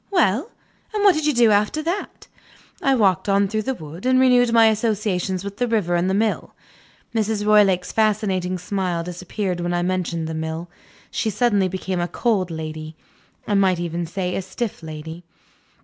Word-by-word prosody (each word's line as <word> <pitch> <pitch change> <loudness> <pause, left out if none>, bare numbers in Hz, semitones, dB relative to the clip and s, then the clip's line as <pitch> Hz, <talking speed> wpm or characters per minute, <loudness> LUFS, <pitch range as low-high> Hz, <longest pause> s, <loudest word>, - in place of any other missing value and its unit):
Well? 315 - +2 0.5
And 415 - 0
what 400 -2 +7
did 310 -1 -1
you 300 - +3
do 235 -2 +5
after 210 +9 +1
that?" 350 +6 -4 0.5
"I 275 -5 +3
walked 200 -5 +2
on 200 0 +3
through 215 +2 -1
the 265 +4 -2
wood, 160 0 -10
and 255 0 +3
renewed 250 -2 +4
my 230 -1 +6
old 220 - +4
associations 205 -4 -1
with 200 0 -7
the 245 - 0
river 210 -7 0
and 175 +2 +1
the 190 - +1
mill." 215 +1 -1 0.6
Mrs. 215 -2 0
Roylake's 200 -4 +4
fascinating 200 -4 +1
smile 180 -2 -2
disappeared 180 +1 -4
when 175 0 -1
I 175 - 0
mentioned 175 -3 -1
the 160 - -4
mill. 160 +2 -4 0.4
She 220 - -1
suddenly 210 -2 +2
became 185 0 -3
a 175 - 0
cold 200 -4 0
lady 155 -1 -6 0.5
I 210 - 0
might 190 -3 +3
even 170 0 -3
say 180 +1 -3
a - - -1
stiff 225 +2 -5
lady. 160 +2 -8
195 Hz, 180 wpm, -22 LUFS, 175-220 Hz, 0.6 s, what